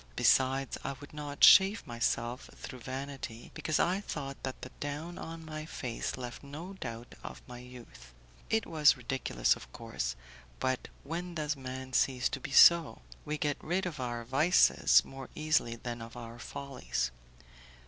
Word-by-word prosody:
Besides, 135 0 +3
I 135 - -2
would 145 - -12
not 145 -1 -5
shave 195 +3 +8
myself, 120 +1 -2
through 130 -2 -8
vanity, 130 -2 -6
because 155 - -1
I 185 +3 +2
thought 140 -8 -5
that 130 -1 -5
the 130 - -7
down 150 +4 -5
on 165 0 -7
my 155 0 -6
face 125 -6 -4
left 125 -1 -6
no 155 +7 -8
doubt 120 -9 -7
of - - -8
my 125 -1 -9
youth. 120 - -13 0.4
It 220 -1 +2
was 150 -2 +4
ridiculous, 120 - +1
of - - -12
course; - - -4 0.4
but 130 -1 -1 0.2
when 170 +4 -5
does 155 -1 -1
man 130 -1 -7
cease 125 0 +2
to 135 - -4
be - - -6
so? 170 +3 +7 0.2
We 150 0 -2
get 145 -1 -1
rid 180 +4 0
of 160 -5 -4
our 120 -2 -3
vices 150 +9 +5
more 135 -1 -9
easily 155 -6 +1
than 120 0 -6
of 115 +1 -9
our 115 0 -8
follies. 130 - -3
135 Hz, 160 wpm, -31 LUFS, 120-155 Hz, 0.4 s, shave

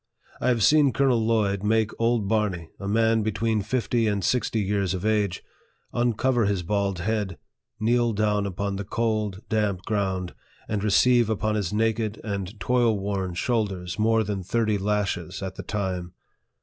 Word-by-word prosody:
I - - -1
have 120 -4 +2
seen 145 -1 +5
Colonel 125 -2 +2
Lloyd 105 -3 +1
make 110 +1 +2
old 115 -3 +2
Barney, 95 -6 -1
a 100 - -5
man 110 +2 +3
between 110 +1 0
fifty 115 +1 0
and 100 -2 0
sixty 120 -1 +1
years 100 -2 0
of 95 +2 -4
age, 105 -4 0 0.5
uncover 120 0 +1
his 100 -3 0
bald 100 +1 0
head, 100 0 -2 0.4
kneel 120 +2 +2
down 105 -1 +1
upon 100 +1 -3
the 100 - -3
cold, 110 -1 -1
damp 105 -4 0
ground, 95 -4 -2 0.3
and 105 -2 -2
receive 120 +2 +4
upon 110 0 0
his 100 -5 -1
naked 110 0 0
and 100 -1 -4
toil 120 +2 +2
worn 95 -2 -3
shoulders 100 -4 -1
more 110 +1 +3
than 100 -2 -3
thirty 110 +2 0
lashes 100 -3 -2
at 95 -1 -4
the - - -7
time. 95 -4 -3
105 Hz, 160 wpm, -25 LUFS, 100-115 Hz, 0.5 s, seen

